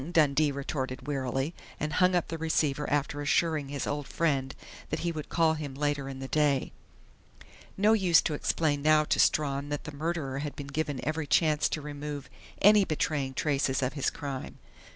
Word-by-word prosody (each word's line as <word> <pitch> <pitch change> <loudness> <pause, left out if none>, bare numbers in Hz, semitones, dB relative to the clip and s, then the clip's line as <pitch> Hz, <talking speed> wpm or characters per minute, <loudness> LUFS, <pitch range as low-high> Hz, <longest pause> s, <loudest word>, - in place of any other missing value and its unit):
Dundee 150 -2 +4
retorted 135 -2 -4
wearily, 135 +1 -2 0.3
and 150 0 -2
hung 180 +2 +4
up 175 - 0
the 165 - -4
receiver 150 -3 0
after 145 0 0
assuring 155 -1 +1
his 140 -1 -3
old 145 -1 -3
friend 135 -5 0 0.3
that - - -2
he 170 - 0
would 155 -2 -6
call 165 -1 +3
on 160 - -2
him 145 -3 -6
later 145 -1 -1
in 135 - -6
the 135 0 -6
day. 145 -2 +1 1.1
No 210 +3 +4
use 185 -7 +5
to 155 - -1
explain 145 0 0
now 155 +1 +5
to - - 0
Strawn 140 -1 +2
that 145 -1 -3
the - - -7
murderer 145 -3 -2
had 145 0 -4
been 145 - -6
given 140 -3 -3
every 155 -1 -1
chance 150 -1 +3
to 155 - -3
remove 145 -1 -6 0.3
any 210 0 +7
betraying 145 -5 -1
traces 135 -2 0
of 130 - -1
his 140 -3 0
crime. 140 -3 -6
145 Hz, 185 wpm, -29 LUFS, 140-155 Hz, 1.1 s, any